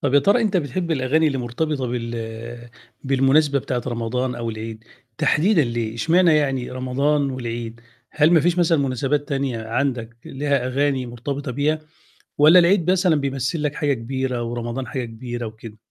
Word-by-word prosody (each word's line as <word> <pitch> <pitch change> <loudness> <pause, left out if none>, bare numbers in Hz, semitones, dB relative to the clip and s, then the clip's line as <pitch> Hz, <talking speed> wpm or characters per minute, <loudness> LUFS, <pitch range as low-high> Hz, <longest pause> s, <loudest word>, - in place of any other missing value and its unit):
طَب 140 -1 0
يا - - +8
ترى 200 +9 +3
أنت 205 -3 +1
بتحب 170 +2 -2
الأغاني 155 +2 +2
اللي 135 -3 0
مرتبطة 130 +3 -2
بال 115 0 -6 0.3
بالمناسبة 135 +2 +3
بتاعة 125 -1 -3
رمضان 125 +1 -2
أو 115 -1 -3
العيد 110 0 -7 0.3
تحديدًا 165 -1 +3
ليه، 115 -1 -3
اشمعنى 165 +5 +4
يعني 135 -4 0
رمضان 135 +3 0
والعيد، 115 -2 -5 0.3
هل 155 +1 +3
ما 165 - +6
فيش 175 +2 +1
مثلًا 165 -2 +3
مناسبات 140 +3 -1
تانية 135 -5 -2
عندك 120 -2 -2
لها 140 -1 -1
أغاني 135 -1 0
مرتبطة 125 +3 -5
بيها، 150 +4 0 0.6
والّا 155 +5 +7
العيد 180 0 +3
مثلًا 185 -3 +3
بيمثّل 140 +2 -2
لك 150 -1 -1
حاجة 145 -3 +1
كبيرة 130 0 -3
ورمضان 120 +2 -4
حاجة 130 0 -3
كبيرة 120 +1 -6
وكده؟ 110 0 -10
135 Hz, 160 wpm, -22 LUFS, 120-150 Hz, 0.6 s, يا